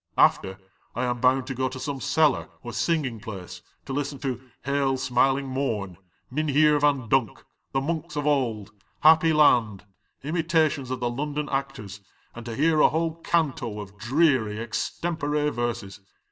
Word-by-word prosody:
After, 95 Hz, 0 st, +3 dB, 0.4 s
I 125 Hz, +2 st, -1 dB
am 120 Hz, -1 st, -2 dB
bound 130 Hz, +1 st, +3 dB
to 130 Hz, -, -4 dB
go 130 Hz, +1 st, -1 dB
to 130 Hz, +1 st, -8 dB
some 140 Hz, -1 st, -4 dB
cellar 155 Hz, -4 st, +2 dB
or 120 Hz, -1 st, -7 dB
singing 145 Hz, -9 st, -1 dB
place 100 Hz, -4 st, -8 dB, 0.2 s
to -, -, -5 dB
listen 140 Hz, 0 st, -2 dB
to 130 Hz, -3 st, -3 dB, 0.2 s
'Hail, 140 Hz, -1 st, +1 dB
smiling 135 Hz, +2 st, +1 dB
morn,' 115 Hz, -9 st, -2 dB, 0.4 s
'JMvuheer 150 Hz, 0 st, +3 dB
Van 140 Hz, -5 st, +2 dB
Dunk,' 115 Hz, -3 st, 0 dB, 0.3 s
'The 135 Hz, -, 0 dB
monks 160 Hz, +2 st, -3 dB
of 145 Hz, -1 st, -2 dB
old,' 115 Hz, -8 st, 0 dB, 0.3 s
'Happy 160 Hz, +1 st, +6 dB
land,' 120 Hz, -10 st, +3 dB, 0.4 s
imitations 160 Hz, -3 st, +1 dB
of 130 Hz, -1 st, -4 dB
the 120 Hz, -1 st, 0 dB
London 150 Hz, +3 st, -3 dB
actors, 135 Hz, -8 st, -4 dB, 0.3 s
and 120 Hz, 0 st, -9 dB
to 115 Hz, -, -4 dB
hear 155 Hz, +3 st, +2 dB
a -, -, +6 dB
whole 165 Hz, +1 st, -2 dB
canto 135 Hz, -11 st, -1 dB
of 100 Hz, -1 st, -8 dB, 0.2 s
<lr 140 Hz, -7 st, +3 dB
extempore 150 Hz, +5 st, -2 dB
verses. 115 Hz, -5 st, -4 dB
135 Hz, 155 wpm, -25 LUFS, 120-150 Hz, 0.4 s, Happy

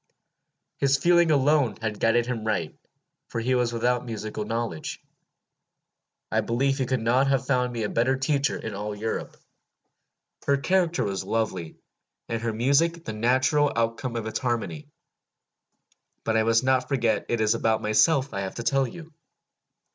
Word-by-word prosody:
His 140 Hz, 0 st, +3 dB
feeling 170 Hz, +1 st, +4 dB
alone 145 Hz, -3 st, +3 dB
had 110 Hz, -2 st, -3 dB
guided 115 Hz, +1 st, +3 dB
him 120 Hz, -3 st, -3 dB
right, 110 Hz, -1 st, -2 dB, 0.5 s
for 115 Hz, -, -4 dB
he 125 Hz, +3 st, 0 dB
was 125 Hz, -1 st, +1 dB
without 120 Hz, +1 st, 0 dB
musical 110 Hz, -2 st, -5 dB
knowledge. 115 Hz, -7 st, -4 dB, 1.3 s
I -, -, +2 dB
believe 135 Hz, +4 st, 0 dB
he 130 Hz, -, 0 dB
could 130 Hz, -3 st, -1 dB
not 125 Hz, +4 st, +3 dB
have 135 Hz, -1 st, +1 dB
found 125 Hz, -2 st, +1 dB
me 115 Hz, -2 st, -3 dB
a -, -, 0 dB
better 130 Hz, +3 st, +1 dB
teacher 140 Hz, +1 st, 0 dB
in 110 Hz, -, -6 dB
all 105 Hz, +1 st, -4 dB
Europe. 110 Hz, +2 st, -4 dB, 1.1 s
Her 140 Hz, 0 st, +4 dB
character 175 Hz, +3 st, +1 dB
was 95 Hz, -2 st, -2 dB
lovely, 95 Hz, -5 st, -2 dB, 0.5 s
and 115 Hz, -1 st, -3 dB
her 115 Hz, -1 st, -1 dB
music 140 Hz, +9 st, +1 dB
the 110 Hz, -, -4 dB
natural 130 Hz, +6 st, +2 dB
outcome 115 Hz, +2 st, -1 dB
of 115 Hz, -2 st, -3 dB
its 110 Hz, -, -3 dB
harmony. 130 Hz, +4 st, -3 dB, 1.4 s
But 110 Hz, -, 0 dB
I 110 Hz, -, +4 dB
must 115 Hz, +2 st, +3 dB
not 130 Hz, -1 st, +2 dB
forget 115 Hz, -6 st, 0 dB
it 120 Hz, -, 0 dB
is 110 Hz, 0 st, +3 dB
about 110 Hz, -1 st, 0 dB
myself 130 Hz, +6 st, +3 dB
I 100 Hz, -, -2 dB
have 95 Hz, -1 st, -4 dB
to 120 Hz, -, -5 dB
tell 135 Hz, +1 st, +2 dB
you. 165 Hz, +5 st, -11 dB
120 Hz, 160 wpm, -26 LUFS, 110-135 Hz, 1.4 s, feeling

